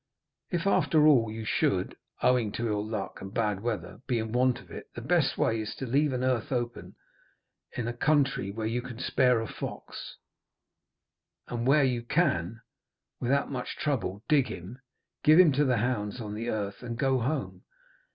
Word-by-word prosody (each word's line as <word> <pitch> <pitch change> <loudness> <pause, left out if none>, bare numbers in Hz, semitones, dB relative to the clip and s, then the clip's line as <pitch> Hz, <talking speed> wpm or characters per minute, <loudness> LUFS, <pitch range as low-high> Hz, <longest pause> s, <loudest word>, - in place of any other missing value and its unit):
If 175 0 -1
after 160 -5 +4
all 125 -7 +5
you 110 0 -6
should, 95 -3 0 0.3
owing 125 -4 +3
to 120 - -2
ill 105 -1 0
luck 105 -2 -5
and 95 - -7
bad 105 -3 0
weather, 105 -4 -4
be 125 - +1
in 110 -1 -3
want 125 +1 +2
of - - -16
it, - - -8
the - - -5
best - - +2
way 115 -1 +1
is 110 - -5
to 135 - -5
leave 140 +4 +2
an 125 -1 -2
earth 130 -3 0
open 120 -2 -3 0.8
in 120 -2 -2
a 120 - -2
country 135 -5 +1
where 110 +2 -4
you 115 +2 -1
can 120 -2 -8
spare 125 -1 +2
a 115 - -4
fox, - - -7 1.3
and 120 0 -2
where 140 +2 +5
you 125 -3 +1
can 115 - 0 0.6
without 140 +4 +1
much 125 -2 -4
trouble 115 -9 -2
dig 145 -5 +4
him, 95 +9 -8 0.4
give 155 +3 +7
him 175 -4 +8
to 145 +2 +2
the 125 -2 +2
hounds 110 -1 -1
on 105 -3 -5
the 115 +3 -3
earth, 100 -3 -3
and 120 -2 -5
go 135 0 +2
home. 135 +4 -3
120 Hz, 180 wpm, -28 LUFS, 110-135 Hz, 1.3 s, him